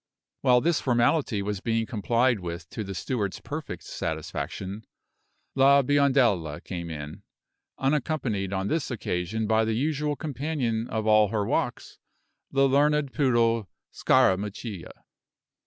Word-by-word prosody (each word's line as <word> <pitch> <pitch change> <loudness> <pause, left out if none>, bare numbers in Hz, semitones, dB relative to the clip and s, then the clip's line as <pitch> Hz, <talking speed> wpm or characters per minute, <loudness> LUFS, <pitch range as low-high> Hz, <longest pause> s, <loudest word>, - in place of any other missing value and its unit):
While 125 -2 +4
this 165 +1 +1
formality 120 -3 +1
was 105 -1 -3
being 115 +2 0
complied 120 +1 +1
with 85 -1 -6
to 110 - -4
the 95 -1 -6
steward's 100 0 -2
perfect 150 +1 -6
satisfaction, 100 +3 -5 0.7
La 140 +1 +5
Biondella 125 - +2
came 85 -3 -5
in, 75 +4 -7 0.6
unaccompanied 135 - -1
on 95 0 -1
this 160 +2 -1
occasion 110 -2 -2
by 110 +1 +3
the 110 0 0
usual 150 +3 0
companion 135 -6 -2
of 110 -2 -3
all 110 -1 +5
her 105 0 -1
walks, - - -2 0.5
the 135 0 +3
learned 145 0 +2
poodle 115 - +2 0.2
Scarammuccia. 100 0 +1
115 Hz, 125 wpm, -26 LUFS, 100-135 Hz, 0.7 s, La